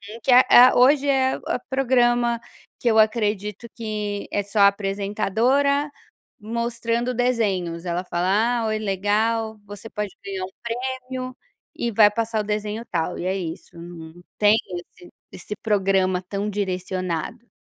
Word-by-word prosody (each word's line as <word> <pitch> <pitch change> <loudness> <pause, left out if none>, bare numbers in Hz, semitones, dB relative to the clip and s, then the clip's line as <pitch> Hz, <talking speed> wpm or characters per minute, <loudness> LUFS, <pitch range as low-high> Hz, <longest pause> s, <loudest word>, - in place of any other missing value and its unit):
Uhum, - - -10
que 265 - +2
a 250 +1 +7 0.3
a - - -3
hoje 280 +3 +5
é 265 -1 +2
o - - -3
programa 240 -3 +2 0.4
que 240 - +1
eu 220 - +3
acredito 215 -1 0
que 210 -3 -4
é 205 - 0
só 205 +1 -1
apresentadora 210 +8 +1 0.5
mostrando 235 +2 -2
desenhos, 200 -9 -1
ela 175 +1 -2
fala: 200 +8 +1
"Ah, 220 - -1
oi, 215 0 -1
legal, 215 +2 0
você 205 +2 -10
pode 210 -2 -3 0.2
ganhar 195 -1 -4
um - - -10
prêmio 255 +1 -5 0.4
e 235 - -2
vai 210 -1 +6
passar 225 0 -1
o - - -5
desenho 210 +1 -3
tal", 170 +1 -2
e - - -4
é 190 +1 0
isso, 170 -1 -7
não 170 0 -11 0.2
tem 210 +1 +5 0.4
esse 175 - -15 0.2
esse 210 - -7
programa 195 -3 +1
tão 200 +2 -3
direcionado. 185 +2 -3
215 Hz, 145 wpm, -23 LUFS, 195-235 Hz, 0.5 s, a